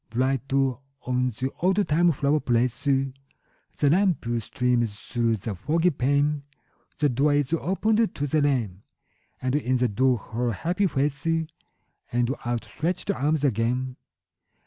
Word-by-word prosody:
Bright 130 +3 -1
on 135 -1 -1
the 130 +1 -2
oldtime 175 -2 +3
flower 145 +1 +1
place 125 0 0
The 135 -1 +2 0.7
lamp 175 +3 +3
streams 120 -1 0
through 115 0 -1
the 105 +2 -4
foggy 160 - +1
pane; 145 +2 +1 0.6
The 150 - +3
door 140 +3 +2
is 145 +1 0
opened 215 +6 +1
to 145 - -1
the 150 +2 +1
rain: 120 -10 0 0.6
And 130 +1 0
in 130 -3 +1
the 125 0 +2
door 125 +4 +2
her 115 +3 -3
happy 180 - 0
face 140 0 -1 0.8
And 120 +1 +1
outstretched 120 - -2
arms 150 -4 0
again. 125 +1 0
135 Hz, 125 wpm, -25 LUFS, 125-150 Hz, 0.8 s, oldtime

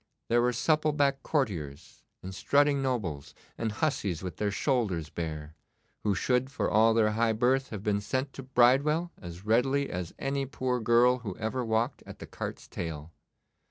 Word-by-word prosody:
There 120 +1 +4
were 125 +1 +2
supple 155 +5 +1
backed 140 -2 +1
courtiers, 85 - -3 0.2
and 95 +1 -6
strutting 140 +6 +2
nobles, 85 - -3 0.2
and 115 -1 -2
hussies 105 - -1
with 90 - -6
their 105 - 0
shoulders 100 - -1
bare, 80 -2 -5 0.5
who 105 -2 +1
should 125 +5 +1
for 110 -7 -2
all 110 +1 +5
their 110 -2 +3
high 115 +1 +1
birth 130 +4 +1
have 105 -3 -6
been 100 -1 0
sent 130 +6 -2
to - - -7
Bridewell 135 +7 +3
as 85 +2 -9
readily 135 +5 +2
as 90 -1 -5
any 135 0 -2
poor 130 -2 -1
girl 120 +2 +4
who 105 -6 -6
ever 115 +3 -2
walked 115 +3 0
at - - -9
the - - -9
cart's - - -7
tail. 80 -2 -6
115 Hz, 170 wpm, -29 LUFS, 95-135 Hz, 0.5 s, all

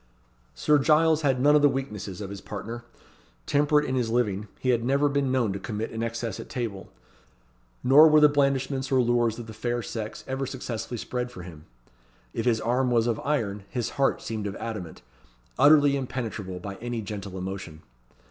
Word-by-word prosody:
Sir 150 -1 +3
Giles 155 +2 +4
had 135 -4 +1
none 145 +3 +5
of 150 - +5
the 145 - +6
weaknesses 105 -8 -5
of 100 -1 -6
his 100 -1 -7
partner. 115 +4 -7 0.6
Temperate 150 +1 +3
in 130 - -2
his 125 -3 0
living, 105 -3 0
he 130 - -1
had 120 -2 +2
never 140 +4 +2
been 140 -2 0
known 120 -6 +1
to 100 - -4
commit 110 +2 -4
an 115 - -4
excess 115 0 -3
at - - -8
table; 110 -8 -4 0.9
nor 145 +5 +8
were 155 0 +6
the 150 - +8
blandishments 140 -2 0
or 130 - +4
lures 120 -2 +2
of 120 - -7
the 110 - -9
fair 120 +2 -2
sex 110 -2 -6
ever 135 0 -2
successfully 125 -2 -5
spread 125 +2 -4
for 105 -8 -9
him. 80 -3 -11 0.7
If - - -2
his 115 -2 +3
arm 125 +3 +1
was 115 -2 +3
of 115 -2 0
iron, 110 -9 -1
his 120 -2 -2
heart 140 -1 0
seemed 110 -2 -3
of 100 - -5
adamant, 105 - -6 0.6
utterly 145 -1 +6
impenetrable 115 -8 -4
by 100 +1 -7
any 120 -1 -4
gentle 100 -2 -6
emotion. 90 -4 -6
120 Hz, 185 wpm, -26 LUFS, 105-135 Hz, 0.9 s, nor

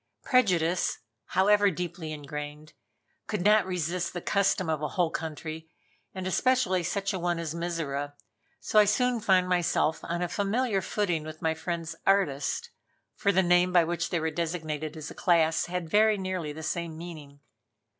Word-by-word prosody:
Prejudice, 180 -9 +2 0.3
however 205 +2 +4
deeply 175 -2 -5
ingrained, 150 0 -7 0.5
could 210 -5 -2
not 210 0 +5
resist 175 -1 -2
the 175 - -3
custom 195 0 +1
of 155 -2 -1
a 150 - 0
whole 170 +2 0
country, 160 0 -5 0.5
and 185 -1 -4
especially 200 -1 +2
such 200 +3 -2
a 190 - -2
one 175 0 0
as 165 -2 -3
Mizora, 160 -4 -3 0.5
so 215 - +3
I 210 - +7
soon 245 +3 +2
found 185 -3 +3
myself 175 -3 +1
on 170 +1 -3
a - - 0
familiar 205 +3 0
footing 180 -5 -1
with 155 +1 -9
my 160 0 +2
friend's 165 0 -4
"artist" 195 - +1 0.4
for 200 - +2
the 190 0 +3
name 180 +1 +4
by 175 -2 +5
which 170 0 -2
they 175 - 0
were 160 0 -1
designated 155 -2 -3
as 155 -1 -7
a - - -7
class 165 -3 +2
had 180 -1 -3
very 215 +4 +4
nearly 185 -5 -3
the 160 +2 -8
same 165 0 -3
meaning. 155 -4 -9
175 Hz, 165 wpm, -28 LUFS, 160-190 Hz, 0.5 s, I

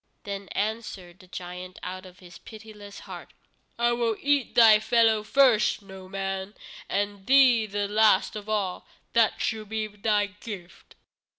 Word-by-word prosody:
Then 200 -1 -6
answered 205 -4 -4
the 185 - -17
giant 180 0 -8
out 185 +1 -7
of 180 0 -16
his 175 -2 -14
pitiless 215 -2 -12
heart: - - -10 0.5
"I 240 0 +2
will 235 -2 0
eat 285 -2 0
thy 225 -3 +7
fellows 220 -1 +2
first, 250 -6 +3
Noman, 195 +1 -6 0.3
and 205 -1 -3
thee 255 -5 +5
the 205 0 -2
last 210 -1 +3
of 210 0 -8
all. 200 -4 -2 0.3
That 230 -2 +3
shall 220 -1 -2
be 215 +1 -3
thy 210 0 0
gift." 205 -3 -11
210 Hz, 140 wpm, -26 LUFS, 195-220 Hz, 0.5 s, thy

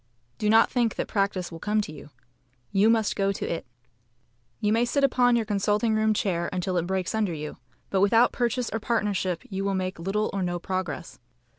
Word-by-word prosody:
Do 210 - +1
not 225 +1 +5
think 235 -3 +1
that - - -2
practice 195 -3 -1
will 165 - -8
come 210 +3 0
to 200 - -6
you. 150 - -11 0.6
You 205 +2 +4
must 225 -2 +2
go 195 -1 +1
to 195 - -4
it. 165 -6 -4 0.9
You 210 -1 +1
may 230 +1 +3
sit 280 +4 0
upon 245 -2 +4
your 230 -2 +1
consulting 210 +2 +1
room 215 0 +2
chair 175 -5 0
until 185 0 -2
it 175 0 0
breaks 190 +1 -1
under 210 -5 0
you, 150 0 -6 0.3
but 190 - +2
without 225 +4 +5
purchase 245 0 -1
or 225 - -2
partnership 205 -6 -1
you 195 -1 -3
will 200 0 0
make 185 -2 -3
little 195 +5 -1
or 195 - -1
no 175 -1 -1
progress. 175 -8 -4
200 Hz, 200 wpm, -26 LUFS, 185-220 Hz, 0.9 s, not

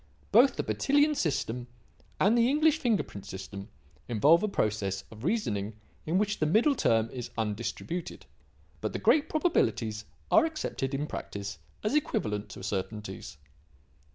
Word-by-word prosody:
Both 245 +6 +6
the - - -1
Bertillon 290 +2 +2
system 130 - -1 0.5
and 205 +4 +4
the 235 +1 +4
English 310 +2 +3
fingerprint 220 - -1
system 100 +2 -8 0.4
involve 145 - +5
a 215 - +1
process 105 - -1
of 110 +1 -11
reasoning 110 - -1 0.3
in 165 +4 +2
which 210 +1 0
the 155 - +2
middle 225 - +4
term 115 - +2
is 125 -2 -6
undistributed. 115 - -3 0.6
But - - -2
the - - -1
great 310 0 +3
probabilities 115 - +1 0.3
are 330 - +7
accepted 310 - -2
in 145 +2 -1
practice 100 - -6 0.2
as 215 - 0
equivalent 105 - 0
to 95 - -9
certainties." 100 -3 -4
135 Hz, 140 wpm, -29 LUFS, -, 0.6 s, are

